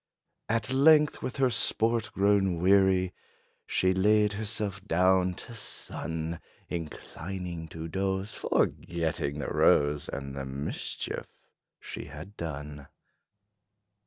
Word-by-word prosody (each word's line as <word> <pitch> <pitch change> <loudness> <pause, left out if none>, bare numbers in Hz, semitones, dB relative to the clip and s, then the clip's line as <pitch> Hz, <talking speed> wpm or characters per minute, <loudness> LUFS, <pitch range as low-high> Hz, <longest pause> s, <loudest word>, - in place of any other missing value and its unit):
At 115 +3 0
length, 150 +2 +5
with 130 - -4
her 130 -2 +3
sport 115 +1 +1
grown 95 -3 +2
weary, 95 0 +4 0.5
She 95 0 +2
laid 105 +2 +3
herself 105 -2 -2
down 90 0 +3
to 120 - -9
sun, 85 -6 -3 0.3
Inclining 85 +1 -5
to 80 0 -6
doze, 95 +3 -1
forgetting 80 -4 -1
the 75 - -3
rose 75 0 +3
And 70 0 -5
the 70 -1 -5
mischief 70 +2 -4 0.5
she - - -7
had 90 +8 -10
done. 75 -4 -6
95 Hz, 105 wpm, -29 LUFS, 80-105 Hz, 0.5 s, length